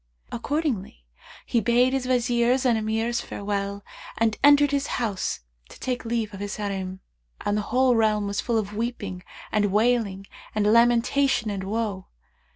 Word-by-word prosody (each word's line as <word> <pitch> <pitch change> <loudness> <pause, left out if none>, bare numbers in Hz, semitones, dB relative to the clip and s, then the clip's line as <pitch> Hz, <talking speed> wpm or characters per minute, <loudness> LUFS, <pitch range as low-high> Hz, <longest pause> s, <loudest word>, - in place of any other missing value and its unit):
Accordingly 240 - -3 0.4
he 235 - +1
bade 245 +4 +3
his 265 -2 -1
Wazirs 245 +1 +2
and 240 -2 +4
Emirs 225 +2 -1
farewell 200 0 -4 0.3
and 225 -1 +2
entered 290 0 +6
his 280 0 0
house 205 -7 -2 0.3
to - - -14
take 250 -1 -3
leave 225 -2 -2
of 195 - -8
his 205 0 -4
Harim; 190 -2 -4 0.4
and 205 - 0
the 210 - +1
whole 255 0 +3
realm 215 -2 +2
was 200 0 -2
full 235 -2 0
of 210 -2 -2
weeping 210 -5 -4 0.3
and 210 -1 +2
wailing 210 -3 +1 0.3
and 210 -1 +1
lamentation 235 +2 +3
and 195 -2 -4
woe. 205 -2 -3
225 Hz, 155 wpm, -25 LUFS, 205-245 Hz, 0.4 s, entered